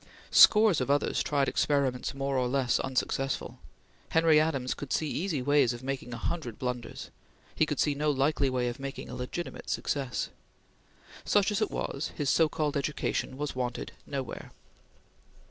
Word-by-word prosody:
Scores 210 - +7
of 125 - -2
others 145 +1 +2
tried 140 -2 +1
experiments 140 -3 0
more 135 0 -2
or 125 -1 +1
less 130 -1 +1
unsuccessful. 135 +1 -2 0.5
Henry 160 -1 +5
Adams 140 -5 0
could 145 - -8
see 155 - +1
easy 155 -4 -2
ways 140 -3 +3
of 120 +1 -9
making 130 -2 -4
a 120 - -4
hundred 125 -3 -3
blunders; 125 -2 -5 0.4
he - - +2
could - - -3
see 150 - +3
no 150 +2 0
likely 140 0 +2
way 125 -1 0
of 120 +2 -4
making 135 0 -6
a - - -6
legitimate 125 +7 -5
success. 135 -4 -2 0.9
Such 205 0 +3
as 210 - -1
it 215 - +1
was, 140 - -3
his 145 -3 0
so 160 -2 +4
called 150 -1 -1
education 140 -2 -2
was 145 -1 -3
wanted 125 -1 -3 0.2
nowhere. 135 -4 -5
140 Hz, 165 wpm, -29 LUFS, 130-150 Hz, 0.9 s, Scores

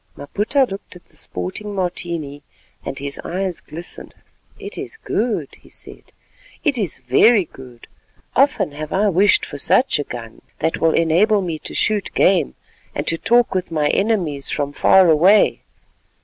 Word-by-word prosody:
Maputa 210 - 0
looked 195 -2 -9
at 180 - -14
the - - -19
sporting 200 - -5
Martini, 170 -6 -3 0.4
and 135 - -5
his 140 0 -5
eyes 185 0 -3
glistened. 170 +3 -10 0.4
"It - - -7
is 445 - -7
good," 230 - -2
he - - -19
said; - - -14 0.5
"it 295 -4 +1
is 190 -8 -2
very 175 - +4
good. 125 -5 -14 0.5
Often 275 - +2
have 150 +1 -7
I 205 +2 +2
wished 195 +2 +3
for 145 - -8
such 255 - +2
a - - -1
gun 115 -4 -9 0.2
that 160 +1 -1
will 165 -1 +2
enable 190 +6 +3
me 165 -3 -4
to - - -8
shoot 210 -3 +1
game, 180 - +3 0.4
and - - -2
to 165 - 0
talk 240 +1 +3
with 185 -1 -2
my 150 -3 0
enemies 180 -10 0
from 145 -1 -2
far 190 +5 +5
away. 175 +7 +4
175 Hz, 160 wpm, -20 LUFS, 145-205 Hz, 0.5 s, far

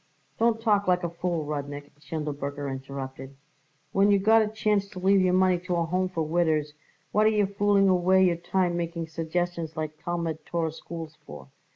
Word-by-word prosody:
"Don't 230 0 +3
talk 210 -3 +2
like 180 0 +2
a 170 - -2
fool, 170 -2 -2
Rudnik!" 145 -1 -5
Schindelberger 145 -1 -4
interrupted. 135 0 -7 0.6
"When 195 +1 +3
you 200 - +5
got 220 +3 +5
a 215 - +1
chance 210 -2 0
to 200 -2 -13
leave 195 +1 +4
your 185 0 +3
money 185 -1 +3
to 180 0 -3
a 170 -1 +1
Home 185 +2 0
for 165 -3 -2
widders, 155 -2 +1 0.4
what 215 +1 +4
are - - +6
you 210 -2 +2
fooling 200 0 +2
away 185 +1 +4
your 175 -2 +2
time 175 0 0
making 170 -1 -3
suggestions 165 0 -3
like 155 0 -5
Talmud 170 -2 -3
Torah 165 -2 -2
schools 160 0 -9
for? 70 -3 -10
175 Hz, 185 wpm, -27 LUFS, 155-190 Hz, 0.6 s, are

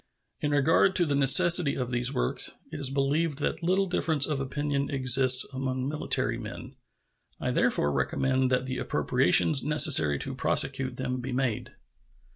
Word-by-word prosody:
In 150 - -3
regard 160 +6 +2
to 175 - +2
the 145 - -2
necessity 150 +3 +4
for 130 - -3
these 125 +1 -2
works, - - -2 0.2
it - - -7
is 140 - +2
believed 140 +3 -2
that 150 +2 -4
little 185 +3 0
difference 160 -5 -1
of 150 -3 -3
opinion 140 +1 -3
exists 130 -1 +3
among 130 0 -4
military 130 -5 -2
men. 125 +4 -10 0.6
I - - -3
therefore 75 - 0
recommend 130 - -1
that 130 0 -1
the 130 -1 -5
appropriations 145 -4 +2
necessary 140 - +3
to - - -6
prosecute 135 -2 0
them 130 -1 -4
be 130 +2 -7
made. 125 -4 -4
135 Hz, 155 wpm, -26 LUFS, 130-150 Hz, 0.6 s, necessity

